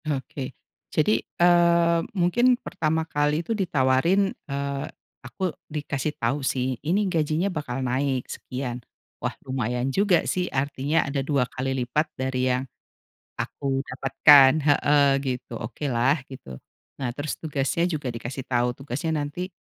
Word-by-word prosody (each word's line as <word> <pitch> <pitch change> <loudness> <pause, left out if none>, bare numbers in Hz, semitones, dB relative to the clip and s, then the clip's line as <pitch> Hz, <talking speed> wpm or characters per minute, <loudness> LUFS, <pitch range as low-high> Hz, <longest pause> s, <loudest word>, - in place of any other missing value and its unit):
Oke. 135 -2 -4 0.3
Jadi, 185 +8 +2
eee, 170 -1 +4 0.2
mungkin 240 +8 +3
pertama 160 0 -1
kali 150 +1 0
itu 230 - -1
ditawarin, 175 +1 +2 0.2
eee, 140 0 -2 0.4
aku 155 +9 -3 0.2
dikasih 150 -1 -3
tahu 125 +5 -1
sih, 130 -2 -1
ini 190 +7 +1
gajinya 160 0 0
bakal 135 -4 -3
naik 130 0 0
sekian. 125 -1 -5 0.4
Wah - - -3
lumayan 125 0 -1
juga 195 -1 +3
sih, 180 -1 -1
artinya 140 +3 0
ada 140 0 -1
2 140 -2 +1
kali 130 +1 -3
lipat 150 +5 0
dari 130 -1 0
yang 125 +1 0 0.7
aku 135 -1 -2
dapatkan 135 +1 +6 0.2
heeh, 145 0 +4 0.2
gitu, 125 -2 -4
oke 120 +6 -6
lah, 130 +4 +2
gitu. 65 - -10 0.4
Nah 130 -3 -1
terus 145 +1 -4
tugasnya 145 0 -1
juga 155 -6 -3
dikasih 120 +3 -6
tahu, 125 -1 +1
tugasnya 145 +4 -3
nanti 160 +6 -4
140 Hz, 135 wpm, -25 LUFS, 130-160 Hz, 0.7 s, dapatkan